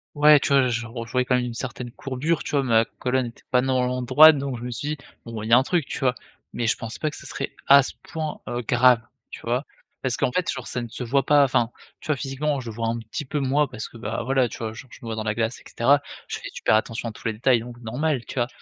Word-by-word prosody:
Ouais, 150 0 +7
tu - - -1
vois 135 -2 +5
j 120 -1 -1
je - - -7
on 115 0 -6
je - - -12
voyais 125 0 +1
quand 125 - +1
même 125 - +1
une 120 -1 -5
certaine 125 0 -5
courbure 135 +6 -2
tu - - -5
vois? 145 -2 +2
Ma 115 -3 +4
colonne 130 +2 -1
était 115 - -10
pas 125 -1 +3
normalement 125 -1 0
droite 150 +5 +8
donc 135 -3 -3
je - - -8
me 125 - -4
suis 125 +5 -4
dit: 155 - -2 0.3
«Bon 115 -2 -6
il 110 - -5
y - - +4
a - - +10
un 130 - +4
truc» 170 +1 0
tu - - -4
vois? 130 -2 +2 0.4
Mais 120 - -1
je 115 - +2
pensais 115 0 -7
pas 155 - 0
que 150 - -10
ce - - -11
serait 140 - -4
à 140 +1 +8
ce 135 - -4
point, 155 -2 -5
heu, 120 - -2
grave, 125 0 +4 0.3
tu - - -8
vois? 125 +4 -1 0.4
Parce 130 -2 +1
qu'en 125 - 0
fait 180 +3 0
sur 125 -2 -4
ce - - -4
n 120 -1 -2
ça 115 - -9
ne - - -6
se - - -12
voit 135 +1 +2
pas, 145 -1 +6
enfin 120 -3 +1 0.3
tu - - -12
vois, 155 - +2
physiquement, 140 +2 -2
je 120 -3 -6
le 110 - -8
vois 115 0 -1
un 115 +1 -2
petit 115 +6 -6
peu 145 +3 -2
moi, 140 +2 +2
parce 125 -4 -7
que - - -13
bah, 110 0 -3
voilà, 130 +1 +2
tu 115 - -9
vois? 110 -1 -3
Genre 110 +4 -10
je - - -12
me 115 - -8
vois 110 - -3
dans 110 - -3
la 110 0 0
glace 115 +2 -2
et - - -19
cetera. 140 +5 +3 0.3
Je - - -4
fais - - -8
super - - +2
attention 115 +1 -1
à - - -6
tous - - -15
les 115 - 0
détails, 120 +1 +2
donc 120 +1 -10
normal, 130 +3 -1
tu - - -9
vois, 120 -2 +1
125 Hz, 315 wpm, -24 LUFS, 115-140 Hz, 0.4 s, a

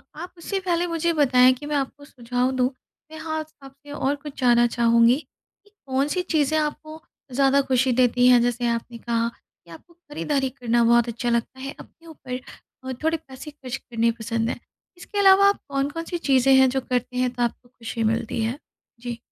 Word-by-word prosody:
आप 350 +4 -8
उससे 385 +4 -3
पहले 355 -2 0
मुझे 335 0 0
बताएँ 255 -4 +5
कि 265 +3 -10
मैं 295 0 -2
आपको 285 +1 -3
सुझाव 250 -1 -2
दूँ 255 0 +2 0.4
मैं 315 - -9
हाँ 315 0 -3 0.2
आपसे 275 +2 -14
और 285 -1 -1
कुछ 290 0 -10
जानना 240 -1 +5
चाहूँगी 235 0 +4 0.5
कि 410 - -25 0.2
कौन 270 +1 0
सी 360 +5 -1
चीज़ें 315 -4 +1
आपको 310 +1 -4 0.3
ज़्यादा 275 +2 +3
खुशी 260 -1 +1
देती 245 0 +3
हैं? 250 -1 +6
जैसे 240 0 0
आपने 235 0 -3
कहा 230 0 -1
कि 170 - -24
आपको 165 - -14
खरीदारी 295 -4 -3
करना 240 -3 0
बहुत 235 0 +4
अच्छा 240 +1 -3
लगता 235 +2 -1
है। 270 +1 -5
अपने 335 - -15
ऊपर 260 -5 -7 0.4
अ, 260 0 -4
थोड़े 325 +1 +1
पैसे 275 -1 -11
खर्च 265 -3 -7
करने 230 -1 -1
पसंद 230 0 -2
हैं। - - -4 0.4
इसके 380 +3 -8
अलावा 395 0 +7
आप 400 - -1
कौन-कौन 280 +4 -2
सी 345 - -3
चीज़ें 270 -4 +3
हैं 265 0 +6
जो 265 +1 -1
करते 250 0 -3
हैं 250 0 +2
तो 245 0 -1
आपको 240 +1 -3
खुशी 230 -1 -5
मिलती 225 +1 -1
है? 235 +6 -3 0.4
जी। 240 -1 -5
260 Hz, 195 wpm, -23 LUFS, 240-295 Hz, 0.5 s, अलावा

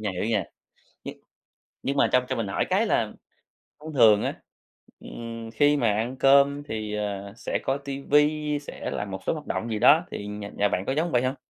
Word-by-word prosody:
nha, 105 -2 -2
hiểu 90 +2 -3
nha. 110 -3 0 0.6
Nhưng - - -7 0.7
nhưng 140 +1 -2
mà - - +4
trong 125 0 +4
cho 130 - -2
mình 115 -3 -2
hỏi - - 0
cái - - +2
là - - 0 0.7
thông 155 +1 -9
thường 110 -5 +6
á, - - -1 0.7
ừm, 115 -1 -8
khi 145 +6 +3
mà 115 -6 +2
ăn 115 +5 -2
cơm 140 +1 +4
thì, 110 -6 -5
ờ, 100 -1 -4
sẽ - - -2
coi 135 - 0
ti 140 0 -4
vi, 150 +1 +2
sẽ - - -7
làm 105 -1 -4
một 95 - -5
số - - +1
hoạt 150 -2 -7
động 115 - -3
gì 110 - -2
đó, 155 +9 +6
thì 100 - -5
nhà 105 0 -6
nhà 105 - +3
bạn 90 - -1
có - - -1
giống 165 +3 -1
vậy 125 0 +2
hông? 130 +2 -1
120 Hz, 220 wpm, -25 LUFS, 105-145 Hz, 0.7 s, thường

